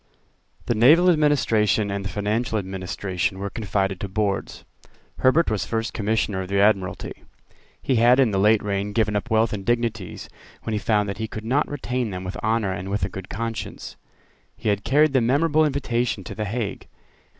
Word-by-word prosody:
The - - +1
naval 155 +11 +6
administration 115 - +2
and 100 0 -3
the 95 - -4
financial 110 +3 -1
administration 95 -1 -3
were 100 +1 -4
confided 95 -3 -1
to 100 - -4
Boards. 100 0 -2 0.5
Herbert 140 +2 +3
was 105 -3 -1
First 115 0 -2
Commissioner 105 -2 -1
of 95 - -5
the 100 +1 0
Admiralty. 100 -3 0 0.6
He 130 - 0
had 120 +3 +5
in 130 -5 +4
the 95 - 0
late 105 +2 +4
reign 100 0 -2
given 105 -1 +1
up 105 +3 -2
wealth 110 0 +2
and 100 -2 -4
dignities 115 -4 -2 0.4
when 110 - -3
he 105 - 0
found 105 -1 +1
that 100 0 -5
he 110 - -2
could 110 0 -8
not 135 +6 +1
retain 125 -4 -2
them 90 -1 -5
with 90 0 -5
honour 110 -2 0
and 95 0 -5
with 100 +1 0
a - - -5
good 95 -1 -8
conscience. 115 +1 -5 0.6
He - - -2
had 100 -1 0
carried 150 +3 +3
the 130 - +4
memorable 150 +6 +3
invitation 120 -7 -1
to - - -7
the 110 - -3
Hague. 110 0 -4
110 Hz, 185 wpm, -23 LUFS, 100-120 Hz, 0.6 s, naval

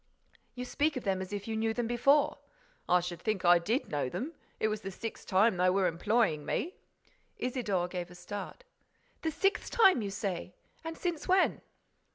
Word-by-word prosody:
"You 250 0 -4
speak 295 +4 0
of 255 - -4
them 190 -2 0
as 185 - -6
if 205 0 -4
you 225 - -2
knew 220 0 0
them 240 - 0
before." 245 +5 +3 0.5
"I 180 0 +5
should 175 -1 -5
think 210 -4 -1
I 175 0 +7
did 225 - -1
know 145 -4 0
them! 245 - -4 0.3
It - - +2
was 215 0 -2
the 195 - -5
sixth 225 +4 -7
time 195 +1 +4
they 180 +1 +4
were 190 +1 +2
employing 175 -1 +1
me." 345 - -2 0.6
Isidore 215 -8 -1
gave 180 -1 -5
a 175 - -13
start: 205 - -7 0.6
"The 320 - 0
sixth 390 +6 0
time, 385 - +5
you 205 - -2
say? 195 -3 -4 0.3
And 325 0 -5
since 345 -4 -3
when?" 370 0 +3
210 Hz, 190 wpm, -31 LUFS, 180-250 Hz, 0.6 s, I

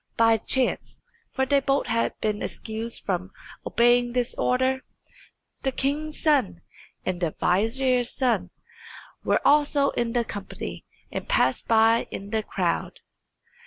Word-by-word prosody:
By 225 -1 +5
chance 255 +4 0 0.3
(for 265 - 0
they 280 +1 +3
both 275 0 +1
had 230 0 -1
been 210 -1 -1
excused 225 +1 -5
from 185 -1 -2 0.3
obeying 240 0 +3
this 245 -1 0
order) 260 +1 +1 0.8
the 265 - 0
king's 295 +4 -2
son 255 - +2 0.4
and 185 -1 -2
the 165 -3 -1
vizier's 245 +6 +2
son 255 -3 0 0.7
were - - +1
also 290 -1 +4
in 235 -1 -2
the 240 -1 +1
company, 190 - -7 0.3
and - - -5
passed 130 +1 +2
by 225 +1 +4
in 200 +1 -7
the 220 -1 +1
crowd. 180 -5 -2
235 Hz, 130 wpm, -25 LUFS, 210-265 Hz, 0.8 s, By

